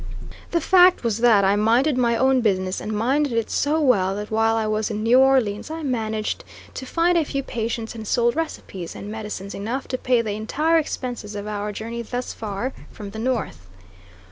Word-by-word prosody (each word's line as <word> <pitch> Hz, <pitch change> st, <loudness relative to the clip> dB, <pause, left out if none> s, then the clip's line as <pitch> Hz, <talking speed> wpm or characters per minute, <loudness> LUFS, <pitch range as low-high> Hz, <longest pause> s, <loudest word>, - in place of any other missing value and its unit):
The 335 Hz, -, 0 dB
fact 365 Hz, 0 st, +5 dB
was 230 Hz, -2 st, 0 dB
that 225 Hz, -4 st, +5 dB
I 195 Hz, +1 st, +3 dB
minded 235 Hz, +7 st, +3 dB
my 235 Hz, -2 st, +2 dB
own 260 Hz, 0 st, +3 dB
business, 185 Hz, -4 st, 0 dB
and 215 Hz, -, -4 dB
minded 260 Hz, +6 st, +1 dB
it 230 Hz, -1 st, -1 dB
so 300 Hz, +3 st, +1 dB
well 200 Hz, -10 st, +2 dB
that 210 Hz, +1 st, -6 dB
while 225 Hz, +1 st, +2 dB
I 220 Hz, -1 st, 0 dB
was 215 Hz, 0 st, -1 dB
in 215 Hz, -1 st, -3 dB
New 240 Hz, +3 st, +5 dB
Orleans 260 Hz, -5 st, +2 dB
I 320 Hz, 0 st, -5 dB
managed 220 Hz, -5 st, -2 dB, 0.3 s
to 260 Hz, -, -7 dB
find 340 Hz, +3 st, +2 dB
a -, -, +2 dB
few 275 Hz, -1 st, -3 dB
patients 230 Hz, -2 st, -3 dB
and 220 Hz, -2 st, -8 dB
sold 235 Hz, +2 st, +2 dB
recipes 195 Hz, -, -5 dB
and 205 Hz, -, -7 dB
medicines 210 Hz, -2 st, -6 dB
enough 235 Hz, +7 st, -4 dB
to 255 Hz, -, -2 dB
pay 245 Hz, -2 st, +2 dB
the 215 Hz, -, -3 dB
entire 300 Hz, +11 st, +1 dB
expenses 245 Hz, -8 st, -5 dB
of 205 Hz, 0 st, -5 dB
our 210 Hz, 0 st, -3 dB
journey 230 Hz, +3 st, -5 dB
thus 245 Hz, +2 st, -4 dB
far, 220 Hz, +4 st, -4 dB, 0.2 s
from 205 Hz, -2 st, -9 dB
the 220 Hz, -, -7 dB
North. 220 Hz, -, -2 dB
230 Hz, 195 wpm, -23 LUFS, 210-260 Hz, 0.3 s, fact